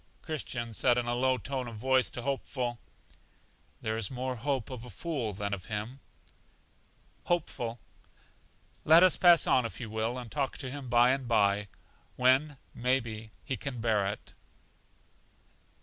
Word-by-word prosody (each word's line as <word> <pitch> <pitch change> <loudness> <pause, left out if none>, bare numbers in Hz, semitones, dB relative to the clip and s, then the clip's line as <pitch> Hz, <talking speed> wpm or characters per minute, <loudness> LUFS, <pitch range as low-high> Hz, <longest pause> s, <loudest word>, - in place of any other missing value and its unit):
Christian 125 -7 -4
said 120 +3 +3
in 120 - 0
a 120 - -1
low 130 +1 +2
tone 130 +1 -4
of 115 - -7
voice 130 +3 +2
to 120 - -7
Hopeful: 130 -3 -2 1.0
There 110 0 -1
is 110 - -1
more 130 0 -3
hope 130 0 -2
of 125 -3 -6
a 125 - -9
fool 125 - -3
than 100 +1 -3
of 90 -2 -5
him. 110 +5 -4 1.3
Hopeful. 120 -9 -2 1.0
Let 165 +3 +8
us 185 - +6
pass 175 -2 +6
on 130 - +4
if 115 - -5
you 115 -4 -6
will, 110 +3 -1
and 120 -3 -7
talk 140 -2 -1
to 130 -2 -4
him 135 -2 -6
by 120 +1 +5
and 135 -2 -1
by, 105 -3 +2 0.5
when, 130 +3 +3 0.2
may 125 +2 +2
be, 110 -2 -7 0.2
he 135 - -1
can 125 +1 -5
bear 110 -3 +1
it. 105 +1 -6
125 Hz, 160 wpm, -30 LUFS, 110-135 Hz, 1.3 s, Let